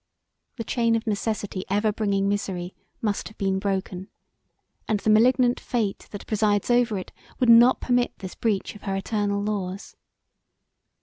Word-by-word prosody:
The 235 - -4
chain 230 0 +1
of 225 +1 -2
necessity 205 -2 -2
ever 210 +2 +2
bringing 200 -2 0
misery 190 -3 -2 0.3
must 210 -2 -1
have 215 - -14
been 195 -1 0
broken 190 -1 -3 0.8
and 215 -2 +1
the 215 - +1
malignant 245 +3 +4
fate 220 -5 -2
that 205 - -8
presides 210 0 +1
over 240 -3 +2
it 185 - -7 0.3
would 250 - +2
not 235 +2 +7
permit 245 -1 0
this 190 -3 -8
breach 215 -4 -1
of 210 - -13
her 195 -1 -3
eternal 200 0 -1
laws. 200 -2 -4
210 Hz, 150 wpm, -25 LUFS, 195-230 Hz, 0.8 s, not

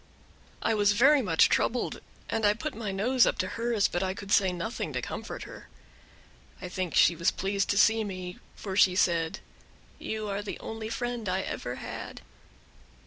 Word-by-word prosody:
I 225 - +2
was 205 -1 +3
very 275 +7 +5
much 165 -8 +4
troubled, 245 +1 0 0.3
and 225 -1 -2
I 205 0 +4
put 300 +5 -4
my 215 -3 -4
nose 235 +6 +3
up - - 0
to 185 -2 -1
hers, 230 -3 +1
but 175 - -2
I 190 0 -1
could 200 0 -8
say 190 -2 +4
nothing 180 +7 -4
to - - -1
comfort - - -6
her. - - -11 0.9
I 185 - -6
think 185 -2 -3
she 170 - +5
was 170 +2 +2
pleased 195 +1 -1
to 200 - +1
see 220 +1 +4
me, 185 -3 -6 0.2
for 190 -2 -6
she 185 -2 +5
said, 165 -3 +1 0.6
"You 215 -1 -4
are 200 0 -2
the 205 - -6
only 220 0 -6
friend 240 -3 -3
I 190 +1 0
ever - - -4
had." - - -7
205 Hz, 185 wpm, -28 LUFS, 185-225 Hz, 0.9 s, very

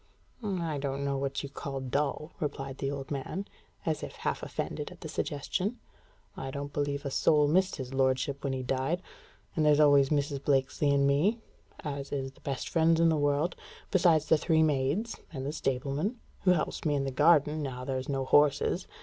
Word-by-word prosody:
"I 170 -7 -2
don't 140 0 -2
know 140 0 0
what 135 +1 -2
you 140 - -5
call 135 0 -5
dull," 140 +4 -2
replied 135 -3 -4
the 135 - -1
old 140 -1 -5
man, 145 +8 -3 0.4
as 155 -2 0
if - - -6
half - - -2
offended - - -4
at - - -14
the - - -5
suggestion. 185 - -2 0.6
"I 135 - -5
don't 140 +1 -5
believe 145 0 -2
a 140 - -2
soul 150 +2 +4
missed 185 +5 +2
his 130 -2 -6
lordship 135 +1 +1
when 140 - 0
he 130 -1 -2
died; 135 +8 -1 0.5
and 160 - +2
there's 150 -1 +5
always 145 -2 +6
Mrs. 145 -2 0
Blakesley 140 +1 +2
and 140 0 +3
me, 150 +11 +3 0.4
as 140 -2 -5
is 135 -2 -2
the - - -23
best 135 -2 -3
friends 165 0 +3
in 165 0 +5
the 160 - +3
world, 145 +3 +1 0.4
besides 170 -5 +4
the 160 - +4
three 160 -1 +3
maids 150 - 0
and 135 -4 -5
the 145 - -2
stableman, 140 - -1 0.3
who 185 - +6
helps 170 - -2
me 150 -2 +1
in 140 - 0
the 135 - -2
garden, 150 +2 +4
now 125 -3 -4
there's 130 0 -3
no 135 -1 -1
horses. 145 +1 +3
145 Hz, 190 wpm, -30 LUFS, 135-155 Hz, 0.6 s, always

